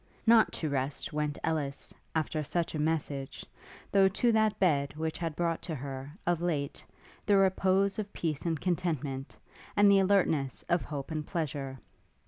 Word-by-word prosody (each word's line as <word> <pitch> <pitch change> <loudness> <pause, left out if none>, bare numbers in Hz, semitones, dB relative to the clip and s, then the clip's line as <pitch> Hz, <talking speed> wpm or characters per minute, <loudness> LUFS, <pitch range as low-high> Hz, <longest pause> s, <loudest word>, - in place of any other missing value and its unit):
Not 225 -1 +6
to 160 - -2
rest 140 0 -2
went 150 -1 -1
Ellis, 150 -4 -2 0.2
after 155 0 0
such 165 +3 -1
a 155 - -2
message, 150 -3 -2 0.5
though 195 -1 +6
to 235 +5 +2
that 220 -1 +2
bed 145 -6 +2
which 160 0 -3
had 165 -3 -3
brought 170 -1 0
to 160 - -4
her, 135 0 -6
of 175 -1 +1
late, 150 -5 -2 0.4
the 205 -1 +5
repose 195 +1 +3
of 205 -1 -4
peace 155 -4 -2
and 165 -3 -1
contentment, 155 -7 -2 0.4
and 205 0 +7
the 200 - +6
alertness 180 -9 +2
of 175 - +3
hope 145 0 -6
and 155 -1 -3
pleasure. 145 -6 -3
160 Hz, 160 wpm, -30 LUFS, 145-185 Hz, 0.5 s, and